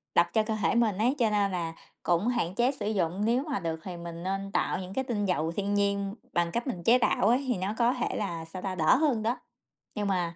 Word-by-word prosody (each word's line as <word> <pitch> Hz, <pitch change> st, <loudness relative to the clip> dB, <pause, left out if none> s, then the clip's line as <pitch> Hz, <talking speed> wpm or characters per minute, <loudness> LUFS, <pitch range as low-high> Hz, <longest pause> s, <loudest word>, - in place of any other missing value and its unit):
độc 170 Hz, -, +5 dB
cho 220 Hz, -, +3 dB
cơ 220 Hz, 0 st, -2 dB
thể -, -, +2 dB
mình 225 Hz, -5 st, +2 dB
ấy, 245 Hz, +6 st, +2 dB
cho 230 Hz, -3 st, +4 dB
nên 200 Hz, -2 st, +2 dB
là 165 Hz, -2 st, -2 dB, 0.3 s
cũng 175 Hz, +5 st, +2 dB
hạn 225 Hz, -8 st, 0 dB
chế 245 Hz, +3 st, +3 dB
sử 215 Hz, -7 st, -5 dB
dụng. 185 Hz, -2 st, 0 dB
Nếu 240 Hz, +4 st, +2 dB
mà 255 Hz, -, 0 dB
được 160 Hz, -1 st, -3 dB
thì 180 Hz, -2 st, -6 dB
mình 170 Hz, 0 st, -7 dB
nên 195 Hz, +1 st, -3 dB
tạo -, -, 0 dB
những 185 Hz, 0 st, -7 dB
cái 265 Hz, -, 0 dB
tinh 220 Hz, -5 st, -1 dB
dầu 165 Hz, -3 st, 0 dB
thiên 200 Hz, +3 st, -2 dB
nhiên 200 Hz, 0 st, 0 dB, 0.2 s
bằng 170 Hz, -1 st, +1 dB
cách 235 Hz, +6 st, -2 dB
mình 180 Hz, -9 st, -3 dB
chế 235 Hz, +7 st, +6 dB
tạo 220 Hz, -4 st, +2 dB
ấy, 250 Hz, +4 st, +3 dB
thì 245 Hz, -5 st, +1 dB
nó 190 Hz, +3 st, -2 dB
có 240 Hz, +1 st, +3 dB
thể 250 Hz, -, -2 dB
là, 170 Hz, -6 st, -3 dB
sao 180 Hz, +3 st, -8 dB
ta, 190 Hz, -1 st, -3 dB
đỡ 160 Hz, +5 st, +4 dB
hơn 270 Hz, -7 st, +2 dB
đó. 235 Hz, +3 st, 0 dB, 0.6 s
Nhưng 205 Hz, -1 st, -1 dB
mà 175 Hz, -3 st, 0 dB
200 Hz, 260 wpm, -28 LUFS, 175-235 Hz, 0.6 s, chế